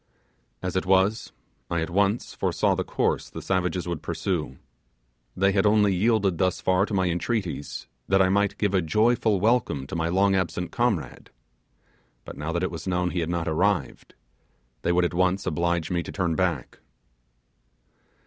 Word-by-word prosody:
As 90 0 -3
it 95 - -1
was, 95 +4 +2 0.4
I 85 -1 0
at 80 - -3
once 100 +4 +1
foresaw - - +1
the - - -1
course - - -1
the - - -7
savages 90 -1 -1
would 85 -3 -3
pursue. 80 -8 -3 0.8
They 95 +1 +3
had 100 +1 +2
only 105 -1 +4
yielded 100 -2 +1
thus 95 -1 +1
far 95 +2 +2
to - - -6
my 95 -1 +2
entreaties, 90 -3 -3 0.2
that 95 0 +3
I 95 - +5
might 100 +1 +1
give 100 -2 0
a 95 - +3
joyful 110 +4 +2
welcome 110 - +1
to 70 - -7
my 80 0 0
long 95 +2 +3
lost 95 -4 0
comrade; 120 -8 -1 1.0
but - - -8
now 75 +2 -4
that 85 +2 -1
it 95 - -1
was 85 +2 -7
known 90 -1 0
he 90 - -2
had 85 -1 -2
not 85 -1 -2
arrived 90 +5 -1 0.7
they 85 - +1
would 90 0 +3
at 85 - -2
once 95 +2 +1
oblige 85 +1 -1
me 85 -1 +1
to - - -7
turn 90 -4 -1
back. 85 -7 -2
95 Hz, 175 wpm, -25 LUFS, 85-100 Hz, 1.0 s, I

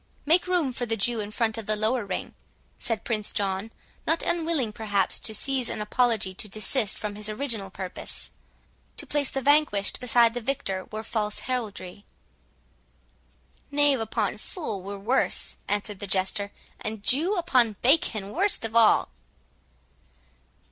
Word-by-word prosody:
"Make 335 +5 +4
room 345 -8 +1
for 245 0 -3
the 225 0 -1
Jew 235 +3 0
in 205 -1 -3
front 220 +1 0
of 220 - -8
the 215 - +2
lower 220 +3 0
ring," 190 - -4 0.5
said 225 -3 -1
Prince 215 -3 0
John, 195 +1 -1 0.4
not 330 - +2
unwilling 320 -9 0
perhaps 205 -3 0
to 220 - 0
seize 265 +1 +1
an - - -3
apology 215 -2 +1
to 200 - -4
desist 215 +2 +1
from 210 -1 -4
his 210 +1 -3
original 215 -4 -1
purpose; 185 -1 -6 0.7
"to - - -5
place 290 -2 0
the 270 - -3
vanquished 285 -9 +3
beside 235 -2 +4
the 245 - -3
victor 220 -7 -2
were 215 +1 -6
false 210 -2 -2
heraldry." 205 -6 -4 1.7
"Knave 290 -2 +3
upon 215 -2 -1
fool 220 - -5
were 200 +2 -6
worse," 230 +7 0
answered 205 -1 -1
the 200 - -4
Jester, 195 +2 0 0.3
"and 215 -1 -5
Jew 325 - +3
upon 250 - +3
bacon 235 -7 +3
worst 390 - +2
of 225 0 -4
all." 230 -2 +6
220 Hz, 150 wpm, -26 LUFS, 205-260 Hz, 1.7 s, all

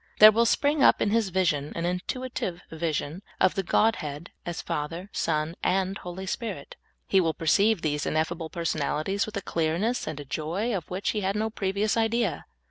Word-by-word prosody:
There 215 0 +10
will 230 +2 +3
spring 290 +3 +2
up - - +6
in 205 - +1
his 225 -3 +2
vision 160 -6 0
an 170 - -2
intuitive 180 0 -3
vision 160 +1 -2 0.2
of 185 - +4
the 195 - 0
Godhead 175 -6 0 0.2
as 175 - -3
Father, 165 +6 -4
Son, 155 0 0
and 190 +1 +1
Holy 180 +2 -6
Spirit. 190 -6 -5 0.3
He 195 - +4
will 165 -2 0
perceive 200 +4 +3
these 150 -2 0
ineffable 160 +1 -1
personalities 165 +3 -1
with 215 -1 -5
a 200 - -4
clearness 170 +9 0
and 145 -2 -5
joy 180 - -2
of 175 -5 -5
which 185 +2 -1
he 210 - -2
had 195 +1 0
no 220 +1 -1
previous 200 +2 0
idea. 225 -6 0
185 Hz, 175 wpm, -27 LUFS, 160-210 Hz, 0.3 s, There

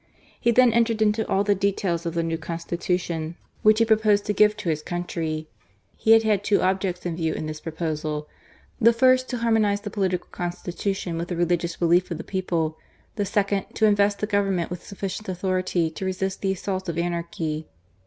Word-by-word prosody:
He - - +2
then 240 0 +5
entered 230 -1 +2
into 215 0 +2
all 195 - +2
the 205 0 +3
details 190 -3 -1
of 165 - -4
the 170 - +1
new 165 0 -1
Consti 170 +1 -4
tution 170 -2 -2 0.3
which 215 0 +5
he 230 - +4
proposed 215 -2 +3
to 210 - 0
give 210 +1 +4
to 210 -5 -3
his 155 -1 0
country. 160 -2 -3 0.5
He 220 - +4
had 225 0 +6
had 210 -3 +2
two 205 0 +3
objects 185 -1 0
in 170 -2 -2
view 160 -2 -1
in - - -4
this 155 0 -6
proposal: 155 -2 -3 0.5
the 230 +2 +6
first 255 +2 +4
to 250 - -2
harmonize 220 -3 +2
the 205 -1 -6
political 185 -4 -1
constitution 175 0 -3
with 170 - -3
the 175 - -3
religious 170 0 0
belief 175 +1 +2
of 170 - -3
the - - -6
people: 170 -5 -2 0.4
the 205 -2 -1
second, 200 0 0
to 220 - +3
invest 205 -1 +3
the 210 - -1
Government 195 -5 0
with 180 - -6
sufficient 200 +1 -5
authority 185 -2 0
to 160 - -7
resist 190 0 -2
the 195 -1 +1
assaults 190 -1 -4
of 165 - -3
anarchy. 170 -2 -2
185 Hz, 195 wpm, -24 LUFS, 170-210 Hz, 0.5 s, had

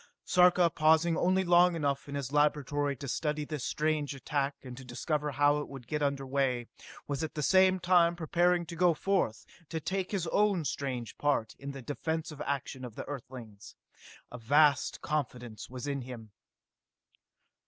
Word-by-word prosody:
Sarka, 180 -1 +5
pausing 160 +2 +3
only 185 +3 +2
long 175 0 +5
enough 140 -2 -2
in 140 - -5
his 140 -2 -4
laboratory 145 -1 +1
to 140 - -8
study 150 +3 -2
this 150 -4 -5
strange 150 -2 -1
attack 140 +1 -2
and 125 -2 -8
to 130 - -10
discover 150 +4 -2
how 145 +1 +3
it 145 - -5
would 135 -3 -10
get 150 +5 -3
under 140 -1 0
way, 130 -3 0 0.4
was 140 +1 -2
at 160 - -5
the 150 - -2
same 185 +3 +4
time 175 -1 +4
preparing 175 +1 +1
to 170 - -8
go 175 -1 +3
forth 185 - 0 0.2
to 165 - -3
take 185 +4 -2
his 195 -5 -1
own 195 -1 +1
strange 130 -5 -4
part 145 -7 0
in 140 - -7
the 135 -2 -7
defensive 155 +3 -4
action 135 -2 -3
of 120 -3 -8
Earthlings. 120 -6 -9 0.6
A 125 - -8
vast 145 +4 +3
confidence 125 -7 -4
was 130 +1 -7
in 140 -1 -2
him.... 120 -4 -9
145 Hz, 165 wpm, -30 LUFS, 135-165 Hz, 0.6 s, Sarka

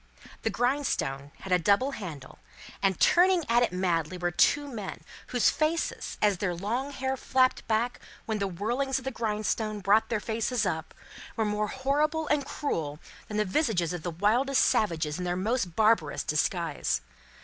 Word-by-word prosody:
The - - 0
grindstone 245 - -1
had 190 - -7
a 180 - +5
double 205 +10 +3
handle, 170 - -8 0.4
and, 195 -2 +1
turning 360 0 +5
at 235 +1 +4
it 245 - +2
madly 180 -2 0
were 175 0 -1
two 290 - +3
men, 220 -8 -6 0.3
whose 245 -2 +3
faces, 315 +2 -1
as 205 -4 +3
their 180 -3 -1
long 230 +10 -2
hair 265 -1 -2
flapped 260 0 +1
back 230 +2 0 0.3
when 220 -1 -2
the 200 - 0
whirlings 240 +9 -1
of 260 - -7
the 265 - -1
grindstone 215 -1 -2
brought 205 +3 +3
their 230 - 0
faces 225 +1 -1
up, 160 -4 -3 0.4
were 220 - 0
more 210 0 0
horrible 295 +6 0
and 285 -2 +1
cruel 155 - -3 0.3
than 210 - -4
the 210 - +2
visages 185 - 0
of 175 - -4
the 175 - -3
wildest 225 +11 +2
savages 160 -6 +1
in - - -3
their 175 0 -1
most 195 -2 -1
barbarous 215 -9 +2
disguise. 160 0 0
215 Hz, 170 wpm, -28 LUFS, 180-260 Hz, 0.4 s, a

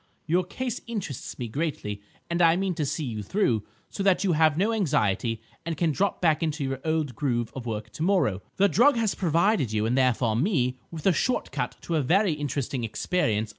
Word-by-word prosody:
Your 175 +4 +2
case 245 +6 -4
interests 200 - -5
me 120 - -4
greatly, 110 -6 -3 0.3
and 170 +1 -1
I 165 -1 +6
mean 190 0 0
to 155 -4 -2
see 155 +2 -2
you 110 -4 -4
through, 115 - +1 0.3
so - - -4
that 195 -1 +3
you 195 - +2
have 155 -2 +3
no 210 +5 +2
anxiety, 115 - 0 0.2
and 165 -2 -3
can 165 -1 +2
drop 195 +6 0
back 160 -3 +2
into 155 -2 -1
your 135 -1 -2
old 155 -5 -1
groove 120 -5 -1
of 125 -2 -6
work 110 -1 -4
tomorrow! 155 - +1
The 200 - +4
drug 245 +8 +4
has 225 -3 +1
provided 170 - +2
you, 110 0 0
and 120 +3 +1
therefore 125 -4 +2
me, 130 - +1
with 160 -3 -8
a 190 - +5
shortcut 250 - -1
to 165 - -1
a - - +2
very 185 +6 +3
interesting 140 -3 -3
experience. 110 - 0
155 Hz, 200 wpm, -26 LUFS, 120-185 Hz, 0.3 s, I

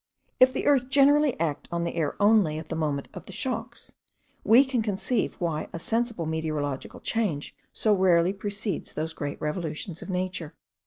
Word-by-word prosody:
If 255 0 +7
the - - -3
earth 265 -3 +3
generally 285 - +4
act 160 -3 -2
on 170 0 -1
the 170 - -2
air 160 -4 -1
only 205 -7 +4
at 155 0 -7
the 165 - -3
moment 150 -3 -1
of - - -10
the - - -8
shocks, - - -4 0.5
we 235 +6 +6
can 260 -3 0
conceive 215 +2 -1
why 165 -4 -2
a - - -3
sensible 230 0 -1
meteorological 155 -3 -3
change 200 -11 -2 0.2
so 215 - +2
rarely 185 -2 +4
precedes 200 -1 -4
those 160 +1 -3
great 145 -2 -5
revolutions 160 +2 -4
of - - -9
nature. 180 -3 -3
180 Hz, 170 wpm, -27 LUFS, 160-225 Hz, 0.5 s, If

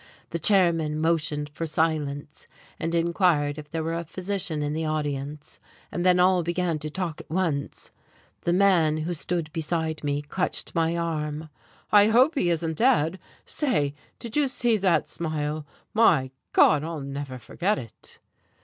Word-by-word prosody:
The 170 - -2
chairman 165 -5 +2
motioned 155 -2 0
for 155 +3 -5
silence 150 -2 -2 0.3
and 165 +1 -1
inquired 165 -4 +2
if 150 -1 -11
there 160 +1 -3
were 165 +1 -2
a 170 0 -2
physician 180 -2 -3
in 145 0 -2
the 160 +1 -2
audience, 150 -1 -4 0.3
and 175 - -2
then 180 0 +4
all 180 0 +4
began 170 -1 -1
to 155 0 -4
talk 170 -1 -4
at - - -19
once. 160 -5 -2 0.5
The 170 - 0
man 175 -5 +4
who 175 - -1
stood 170 -1 -2
beside 160 -1 -2
me 145 0 -1
clutched 180 +5 -2
my 165 0 +1
arm. 155 -2 -3 0.4
"I 205 0 +7
hope 250 +8 +5
he 180 -11 +1
isn't 165 -1 -1
dead! 190 - +3 0.3
Say, 150 - 0 0.2
did 235 -2 -7
you 295 -2 +3
see 240 -3 +1
that 190 -3 +2
smile? 155 -2 -3 0.3
My 155 - +4 0.2
God, 150 -1 +5
I'll 160 -2 -4
never 140 -1 -5
forget 175 - -1
it!" 115 - -11
160 Hz, 160 wpm, -26 LUFS, 150-180 Hz, 0.5 s, I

